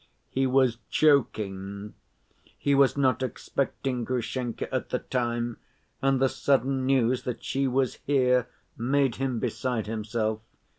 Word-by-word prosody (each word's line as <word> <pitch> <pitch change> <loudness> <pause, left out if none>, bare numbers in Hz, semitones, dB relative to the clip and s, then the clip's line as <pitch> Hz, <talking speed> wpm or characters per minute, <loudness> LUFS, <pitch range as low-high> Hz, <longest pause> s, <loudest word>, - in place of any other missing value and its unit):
He 135 0 +1
was 130 -3 +3
choking. 105 -8 +1 0.6
He 140 - +1
was 140 0 +4
not 130 -3 +2
expecting 130 -1 -2
Grushenka 120 0 -2
at - - -1
the - - 0
time, 120 -2 -2 0.4
and 135 -1 +2
the 135 - +4
sudden 135 0 +1
news 130 -2 +3
that 125 -2 -5
she 135 0 0
was 130 0 0
here 125 -3 +3 0.3
made 135 +1 +1
him 130 -2 -1
beside 120 0 -2
himself. 110 0 -2
125 Hz, 130 wpm, -27 LUFS, 115-135 Hz, 0.6 s, was